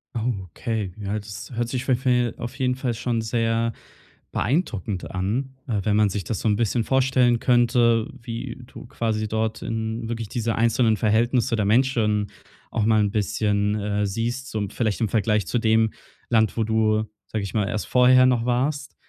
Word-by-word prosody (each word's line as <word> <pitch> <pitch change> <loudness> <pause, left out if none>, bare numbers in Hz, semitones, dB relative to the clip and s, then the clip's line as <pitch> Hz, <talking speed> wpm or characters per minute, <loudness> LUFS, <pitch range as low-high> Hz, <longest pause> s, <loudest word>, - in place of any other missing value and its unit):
Oh, 120 +2 0 0.2
okay, 110 -6 -3
ja, 100 +2 -2
das 105 +5 -8
hört 120 0 -1
sich 130 0 -3
für, 130 - +3
äh 125 -2 +2
auf 120 +2 -6
jeden 125 -1 +1
Fall 130 -2 -2
schon 115 0 -1
sehr 115 0 0 0.6
beeindruckend 105 - -1
an, 115 +9 -2
äh, 110 -4 0
wenn 105 -1 +1
man 105 -1 +4
sich 100 -1 -3
das 105 +3 -3
so - - -1
'n 105 - +3
bisschen 115 +1 0
vorstellen 130 -2 +3
könnte, 120 -2 +3
wie 115 +1 -6
du 120 - -12
quasi 110 -2 -2
dort 110 +1 -2
in 110 +1 -3
wirklich 115 -2 -3
diese 115 -1 -1
einzelnen 115 -1 +2
Verhältnisse 115 +2 +2
der 105 -2 0
Menschen 110 -3 +2 0.4
auch 110 -2 0
mal 110 -1 +4
'n 105 - +2
bisschen, 105 0 0
äh, 105 0 -1
siehst, 120 +5 -3
so 110 - -2
im 100 - -2
vielleicht 110 0 -1
im 110 - +1
Vergleich 105 -3 +1
zu 120 - 0
dem 110 0 +3 0.4
Land, 110 -1 +2
wo 115 - +2
du, 110 -1 +2 0.2
sage 110 -2 -3
ich 100 - -5
mal, 105 -2 +1
erst 105 - -3
vorher 130 0 +6
noch 120 -2 +1
warst. 135 +4 -1
115 Hz, 185 wpm, -24 LUFS, 105-120 Hz, 0.6 s, vorher